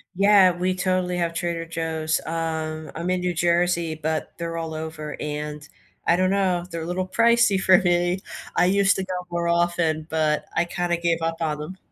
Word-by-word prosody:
Yeah, 195 Hz, -1 st, +6 dB
we 185 Hz, +1 st, 0 dB
totally 185 Hz, -1 st, 0 dB
have 170 Hz, -1 st, -1 dB
Trader 170 Hz, 0 st, -2 dB
Joe's. 160 Hz, -1 st, -1 dB
Um, 160 Hz, -1 st, -3 dB
I'm 170 Hz, +2 st, -3 dB
in 185 Hz, 0 st, +1 dB
New 180 Hz, 0 st, -1 dB
Jersey, 170 Hz, -1 st, +1 dB
but 155 Hz, 0 st, -3 dB
they're 165 Hz, 0 st, -4 dB
all 165 Hz, -1 st, -4 dB
over 155 Hz, -1 st, -6 dB
and 150 Hz, 0 st, -5 dB, 0.4 s
I 170 Hz, -, +5 dB
don't 185 Hz, +1 st, +2 dB
know, 185 Hz, -3 st, +1 dB
they're 165 Hz, -, -4 dB
a 160 Hz, -, -5 dB
little 185 Hz, +1 st, -2 dB
pricey 230 Hz, -1 st, +3 dB
for 185 Hz, -1 st, +6 dB
me. 175 Hz, -1 st, +1 dB, 0.4 s
I 180 Hz, -, +4 dB
used 195 Hz, +2 st, +3 dB
to 190 Hz, -, -2 dB
go 185 Hz, -, -4 dB, 0.2 s
more 170 Hz, 0 st, -1 dB
often, 170 Hz, -2 st, +1 dB
but 155 Hz, -1 st, 0 dB
I 165 Hz, -, +2 dB
kind 175 Hz, 0 st, -3 dB
of 170 Hz, -, 0 dB
gave 165 Hz, -1 st, +1 dB
up 165 Hz, 0 st, -1 dB
on 150 Hz, -2 st, -1 dB
'em. 185 Hz, +5 st, -7 dB
170 Hz, 195 wpm, -24 LUFS, 160-180 Hz, 0.4 s, Yeah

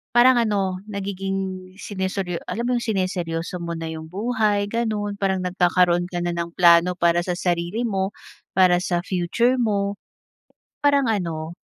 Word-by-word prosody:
Parang 250 Hz, +2 st, +7 dB
ano, 195 Hz, -5 st, 0 dB
nagiging 195 Hz, -1 st, -4 dB
siniseryo 190 Hz, -3 st, -3 dB
alam 235 Hz, +2 st, -3 dB
mo 250 Hz, -, +1 dB
'yong 235 Hz, -, -3 dB
sineryoso 180 Hz, -4 st, -2 dB
mo 170 Hz, 0 st, -3 dB
na 165 Hz, -, -4 dB
'yong 160 Hz, 0 st, -7 dB
buhay, 210 Hz, 0 st, +1 dB
gano’n. 215 Hz, -3 st, -1 dB
Parang 190 Hz, -1 st, +1 dB
nagkakaroon 180 Hz, -1 st, +2 dB
ka 175 Hz, -, -3 dB
na 175 Hz, 0 st, -1 dB
ng 170 Hz, 0 st, -3 dB
plano 175 Hz, 0 st, +5 dB
para 170 Hz, 0 st, +3 dB
sa 180 Hz, -, -1 dB
sarili 175 Hz, +5 st, -1 dB
mo, 195 Hz, -1 st, -1 dB, 0.4 s
para 180 Hz, -2 st, +5 dB
sa 175 Hz, -1 st, 0 dB
future 195 Hz, +8 st, +1 dB
mo. 200 Hz, -3 st, 0 dB, 0.9 s
Parang 285 Hz, -2 st, +4 dB
ano 170 Hz, -6 st, -2 dB
190 Hz, 150 wpm, -23 LUFS, 175-205 Hz, 0.9 s, Parang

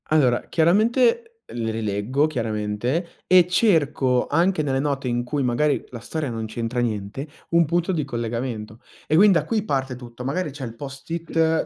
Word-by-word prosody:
Allora 130 Hz, -6 st, +3 dB
chiaramente 230 Hz, -, +3 dB, 0.3 s
le 115 Hz, -1 st, -2 dB
rileggo, 110 Hz, +6 st, 0 dB
chiaramente, 115 Hz, -, -2 dB, 0.2 s
e 185 Hz, -1 st, +7 dB
cerco 145 Hz, -, +2 dB
anche 170 Hz, +2 st, +2 dB
nelle 135 Hz, -2 st, 0 dB
note 140 Hz, -2 st, -1 dB
in 120 Hz, 0 st, 0 dB
cui 140 Hz, +2 st, -1 dB
magari 135 Hz, +4 st, +1 dB
la 120 Hz, -, -8 dB
storia 155 Hz, +3 st, -4 dB
non 115 Hz, -1 st, -4 dB
c'entra 115 Hz, +2 st, -3 dB
niente, 115 Hz, +3 st, -3 dB, 0.2 s
un 170 Hz, 0 st, +4 dB
punto 175 Hz, +3 st, 0 dB
di 155 Hz, -6 st, -1 dB
collegamento. 115 Hz, -3 st, -4 dB, 0.3 s
E 155 Hz, -, +1 dB
quind 200 Hz, +2 st, +7 dB
da 165 Hz, -, +2 dB
qui 220 Hz, -3 st, 0 dB
parte 135 Hz, -8 st, -1 dB
tutto, 120 Hz, -1 st, -10 dB
magari 150 Hz, +5 st, -2 dB
c'è 135 Hz, -1 st, -6 dB
il 115 Hz, -1 st, -8 dB
post-it 160 Hz, +4 st, -1 dB
135 Hz, 165 wpm, -23 LUFS, 120-165 Hz, 0.3 s, e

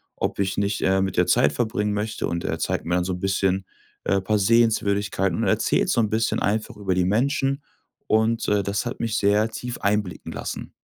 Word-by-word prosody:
ob -, -, -3 dB
ich 95 Hz, -1 st, 0 dB
nicht, 100 Hz, +1 st, 0 dB
äh, 95 Hz, 0 st, +2 dB
mit 95 Hz, -1 st, -2 dB
der -, -, +3 dB
Zeit 70 Hz, -, +4 dB
verbringen 105 Hz, +1 st, -1 dB
möchte 105 Hz, +1 st, -2 dB
und 85 Hz, 0 st, -3 dB
er -, -, -2 dB
zeigt -, -, -2 dB
mir 90 Hz, +1 st, 0 dB
dann 90 Hz, -, +1 dB
so 95 Hz, 0 st, -2 dB
'n 90 Hz, -, -5 dB
bisschen, 95 Hz, -1 st, 0 dB, 0.4 s
äh, 95 Hz, -1 st, +2 dB
paar 105 Hz, +2 st, +1 dB
Sehenswürdigkeiten 100 Hz, -4 st, +2 dB
und -, -, -1 dB
erzählt -, -, +2 dB
so -, -, +2 dB
'n 110 Hz, -2 st, +2 dB
bisschen 110 Hz, +1 st, 0 dB
einfach 105 Hz, +1 st, -1 dB
über 95 Hz, -3 st, -1 dB
die 90 Hz, -, +2 dB
Menschen, 135 Hz, +6 st, +1 dB, 0.5 s
und, 110 Hz, +1 st, +2 dB
äh, 105 Hz, -1 st, +2 dB
das 100 Hz, +4 st, -2 dB
hat 120 Hz, -, -5 dB
mich 110 Hz, -2 st, -1 dB
sehr 105 Hz, +2 st, +3 dB
tief 120 Hz, +2 st, -6 dB
einblicken 100 Hz, -5 st, -1 dB
lassen. -, -, -6 dB
105 Hz, 210 wpm, -24 LUFS, 95-110 Hz, 0.5 s, Zeit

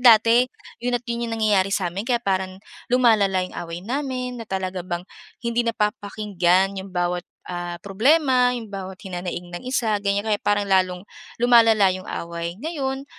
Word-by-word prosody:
dati 235 Hz, +1 st, +6 dB, 0.3 s
'yon 245 Hz, 0 st, 0 dB
at 245 Hz, -, -8 dB
'yon 235 Hz, 0 st, -2 dB
yung 225 Hz, -, -3 dB
nangyayari 205 Hz, -3 st, +3 dB
sa'min 195 Hz, +4 st, -2 dB
kaya 240 Hz, -2 st, +2 dB
paran 190 Hz, -1 st, -1 dB, 0.4 s
lumalala 210 Hz, -7 st, +4 dB
yung 185 Hz, -, -9 dB
away 170 Hz, 0 st, -5 dB
namin 255 Hz, 0 st, -3 dB
na -, -, -5 dB
talaga 190 Hz, -1 st, -2 dB
bang 175 Hz, -1 st, -4 dB, 0.4 s
hindi 235 Hz, 0 st, +1 dB
napapakinggan 200 Hz, -4 st, +1 dB
yung 195 Hz, -, -9 dB
bawat, 175 Hz, 0 st, -1 dB, 0.2 s
ah, 175 Hz, -1 st, -4 dB
problema, 250 Hz, +4 st, +3 dB
yung 225 Hz, -3 st, -7 dB
bawat 190 Hz, -1 st, -6 dB
hinanaing 175 Hz, -2 st, -5 dB
ng -, -, -5 dB
isa, 230 Hz, -5 st, +1 dB
ganyan, 200 Hz, 0 st, 0 dB
kaya 210 Hz, -2 st, +1 dB
parang 205 Hz, 0 st, +1 dB
lalong 185 Hz, -1 st, +2 dB, 0.4 s
lumalala 225 Hz, -5 st, +6 dB
yung 185 Hz, 0 st, -7 dB
away. 170 Hz, +1 st, -4 dB
Ngayon, 275 Hz, -3 st, -3 dB
205 Hz, 160 wpm, -23 LUFS, 185-235 Hz, 0.4 s, dati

